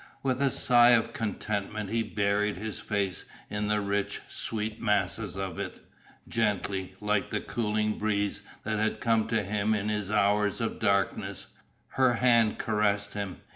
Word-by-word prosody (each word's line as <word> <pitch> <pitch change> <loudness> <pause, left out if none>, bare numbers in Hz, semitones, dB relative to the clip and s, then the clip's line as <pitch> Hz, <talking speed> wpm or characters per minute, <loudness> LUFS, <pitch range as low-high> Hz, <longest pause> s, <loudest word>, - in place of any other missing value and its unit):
With 130 -1 0
a 140 - +4
sigh 120 -1 +5
of 115 - -2
contentment 105 -1 -3
he 115 0 +1
buried 105 -2 0
his 105 +1 -5
face 100 -4 -2 0.3
in 105 0 -1
the 105 0 +2
rich, 100 0 -1
sweet 110 0 -4
masses 105 -2 0
of 95 -3 -4
it. - - -5 0.5
Gently, 100 -4 -1
like 105 -1 0
the - - -1
cooling 105 -2 -1
breeze 105 -1 0 0.2
that 110 0 -1
had 110 +1 0
come 115 -2 +2
to 115 -2 +1
him 105 +2 0
in 105 0 -1
his 105 -2 -2
hours 105 0 +2
of 115 -1 -2
darkness, 100 -3 0 0.4
her 130 -2 +3
hand 115 -3 +4
caressed 105 -2 0
him. 100 -3 -5
105 Hz, 155 wpm, -29 LUFS, 100-110 Hz, 0.5 s, sigh